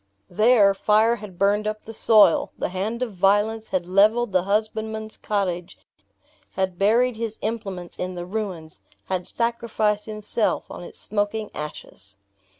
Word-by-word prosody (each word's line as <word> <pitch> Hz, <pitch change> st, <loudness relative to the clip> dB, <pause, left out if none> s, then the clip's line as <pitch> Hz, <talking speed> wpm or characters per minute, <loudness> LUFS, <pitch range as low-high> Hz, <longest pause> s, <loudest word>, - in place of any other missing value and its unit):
There, 215 Hz, -2 st, +5 dB
fire 215 Hz, +4 st, +3 dB
had 205 Hz, -4 st, -11 dB
burned 205 Hz, +3 st, +2 dB
up 215 Hz, 0 st, -4 dB
the 225 Hz, -, -8 dB
soil; 215 Hz, -5 st, +5 dB
the -, -, -2 dB
hand 210 Hz, +7 st, -2 dB
of 230 Hz, -4 st, -5 dB
violence 205 Hz, +4 st, +2 dB
had 180 Hz, -2 st, -1 dB
leveled 210 Hz, +5 st, +3 dB
the 185 Hz, -1 st, +3 dB
husbandman's 220 Hz, +2 st, -2 dB
cottage; 180 Hz, -4 st, -3 dB, 0.8 s
had 190 Hz, -2 st, -2 dB
buried 230 Hz, +4 st, +3 dB
his 225 Hz, -1 st, -4 dB
implements 195 Hz, -6 st, -4 dB
in 180 Hz, 0 st, -3 dB
the 175 Hz, 0 st, -5 dB
ruins; 185 Hz, -6 st, -5 dB, 0.3 s
had 185 Hz, -2 st, -2 dB
sacrificed 225 Hz, -3 st, -1 dB
himself 215 Hz, +1 st, -1 dB
on -, -, -8 dB
its -, -, -9 dB
smoking 210 Hz, +1 st, -2 dB
ashes! 100 Hz, -10 st, -8 dB
210 Hz, 145 wpm, -23 LUFS, 185-220 Hz, 0.8 s, There